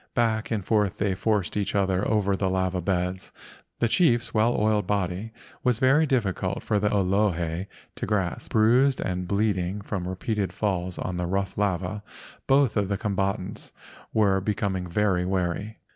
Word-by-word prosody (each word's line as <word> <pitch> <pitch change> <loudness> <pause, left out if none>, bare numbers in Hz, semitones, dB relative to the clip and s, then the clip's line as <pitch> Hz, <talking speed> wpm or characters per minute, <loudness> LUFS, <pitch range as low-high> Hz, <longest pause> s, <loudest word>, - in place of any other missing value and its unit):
Back 115 -2 +1
and 105 -5 -2
forth 105 -4 +1
they 100 -1 0
forced 100 -1 0
each 105 -1 -1
other 95 -1 +1
over 100 -3 +2
the 95 0 0
lava 95 -1 0
beds. 90 +1 -2 0.5
The 120 - +2
chief's 120 -3 +2
well 115 +2 +2
oiled 105 -2 +1
body 100 +1 -1 0.3
was 125 -3 +2
very 135 +6 +4
difficult 100 -7 -1
for 105 -2 +1
the 105 0 +1
Olohe 95 -3 0 0.3
to - - -3
grasp. 100 -4 -1
Bruised 125 +5 +4
and 90 -1 -2
bleeding 100 -1 0
from 100 -3 -4
repeated 100 +2 -2
falls 90 -4 -2
on 90 -1 -3
the 90 -1 -2
rough 95 +1 -1
lava, 95 0 -1 0.5
both 135 -4 +3
of 100 -2 +1
the 100 0 -1
combatants 95 -2 -3 0.4
were 100 -3 +3
becoming 95 -2 -1
very 95 0 +1
weary. 95 +3 -2
100 Hz, 160 wpm, -26 LUFS, 95-110 Hz, 0.5 s, very